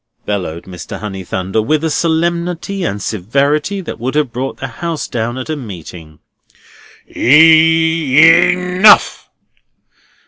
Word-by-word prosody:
bellowed 90 -5 -4
Mr. 90 -4 -9
Honeythunder, 95 0 -4
with 155 +6 -1
a 160 - -1
solemnity 170 +4 -2
and 105 - -3
severity 140 - -1
that 175 - -8
would 130 +4 -4
have 150 -5 0
brought 130 +2 -5
the - - -6
house 160 +6 -5
down 120 +1 -4
at 130 - -6
a 155 - -3
meeting, 90 - -10 0.9
"E 160 0 +3 0.3
e 175 - +2
nough! 180 +3 +3
145 Hz, 125 wpm, -14 LUFS, 105-165 Hz, 0.9 s, E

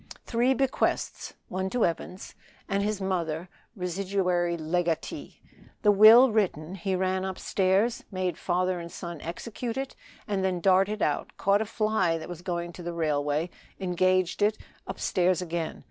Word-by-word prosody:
Three 245 +3 +2
bequests 270 0 -1
(one 190 +1 -2
to 245 +3 +2
Evans), 175 +2 -4 0.3
and 195 0 0
his 210 0 -1
mother 175 -3 -2 0.3
residuary 180 -2 0
legatee. 165 +1 -2 0.4
The 210 - +6
will 220 +5 +8
written, 185 -6 0
he 190 0 -2
ran 185 0 0
upstairs, 190 +3 0
made 185 -2 -2
father 180 0 0
and 170 0 -8
son 170 -3 -7
execute 230 +8 -5
it, 270 0 -4 0.3
and 200 -3 -1
then 185 -2 0
darted 195 +4 +3
out, - - -1
caught 200 +1 +3
a - - -1
fly 215 -6 +1
that 160 - -8
was 175 -1 -7
going 175 -1 -3
to 180 - -9
the 175 0 -4
railway, 150 0 0 0.3
engaged 185 0 +1
it; 210 +1 +3 0.3
upstairs 180 -1 +1
again. 170 -2 -3
185 Hz, 145 wpm, -27 LUFS, 175-200 Hz, 0.4 s, will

